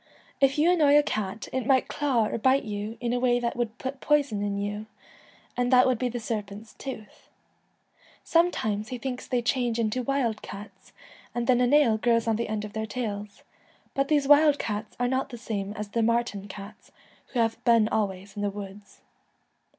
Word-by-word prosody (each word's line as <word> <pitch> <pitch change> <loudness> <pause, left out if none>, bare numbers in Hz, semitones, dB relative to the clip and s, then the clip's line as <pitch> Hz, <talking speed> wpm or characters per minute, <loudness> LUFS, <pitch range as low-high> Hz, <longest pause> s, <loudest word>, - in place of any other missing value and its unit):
If 275 +1 +3
you 320 +4 +4
annoy 295 -5 +5
a 295 - +5
cat 215 -5 -3
it 255 -2 -2
might 260 -2 +3
claw 265 -7 +1
or - - -3
bite 260 +4 +3
you 210 +1 -5
in 240 -1 -1
a 245 - +1
way 245 -1 +3
that 235 -1 -2
would 235 -1 -3
put 265 +1 -5
poison 285 -9 +2
in 205 -1 -1
you, 205 +1 -4 0.7
and 245 +1 0
that 255 0 +7
would 255 -3 +1
be 250 - 0
the 240 0 -4
serpent's 215 -1 -5
tooth.' 255 -6 -9 0.9
Sometimes 220 -12 +1
he 250 - -5
thinks 250 0 -5
they 245 -2 0
change 245 -1 0
into 230 +2 0
wild 245 -4 -1
cats, 200 -1 -10 0.4
and 240 -1 -1
then 250 -1 +3
a 250 - +4
nail 255 -5 +4
grows 230 0 +2
on 225 - +2
the 235 -1 -3
end 210 -1 -2
of 210 - -9
their 220 0 -3
tails; 210 -4 -5 0.5
but 275 0 0
these 290 -2 +2
wild 295 0 +6
cats 210 -2 -4
are 245 - +2
not 260 +2 -1
the 240 - -8
same 205 -4 -4
as 210 -1 -6
the 230 +3 0
marten 230 -3 0
cats, 200 +1 -11 0.4
who 250 - -3
have 225 +1 0
been 230 -3 +5
always 195 -2 -2
in 205 - -4
the 205 - +1
woods. 200 0 -10
230 Hz, 195 wpm, -27 LUFS, 210-255 Hz, 0.9 s, that